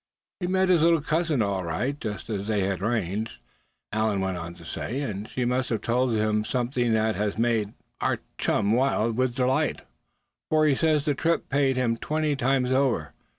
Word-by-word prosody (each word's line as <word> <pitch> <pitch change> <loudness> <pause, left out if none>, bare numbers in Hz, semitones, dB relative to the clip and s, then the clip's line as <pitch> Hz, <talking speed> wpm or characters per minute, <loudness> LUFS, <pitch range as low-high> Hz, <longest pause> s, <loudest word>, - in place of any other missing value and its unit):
"He 180 - -2
met 190 0 +2
his 175 -4 +5
little 165 -1 +4
cousin, 155 -6 +1
all 100 -2 -1
right, 125 - -2
just 105 -3 -5
as 100 -2 -3
they 105 -2 +1
had 95 -1 -1
arranged," 110 0 -1 0.5
Allan 110 -2 +1
went 95 -1 -1
on 85 0 -6
to 85 -1 -14
say. 120 - -4
"And 105 -6 -4
she 125 - -2
must 125 +1 0
have 115 - -1
told 120 0 +1
him 105 0 +1
something 120 0 0
that 110 0 +2
has 105 0 -1
made 115 -3 +1 0.3
our - - +1 0.2
chum 105 -1 +1
wild 115 -2 +2
with 130 -2 +1
delight, 130 0 +1 0.7
for 155 0 +4
he 150 - +4
says 155 0 +2
the 150 - +2
trip 165 +4 0
paid 135 -2 +2
him 120 -2 +1
twenty 155 +2 0
times 130 -1 +1
over. 125 - +1
120 Hz, 190 wpm, -26 LUFS, 105-140 Hz, 0.7 s, his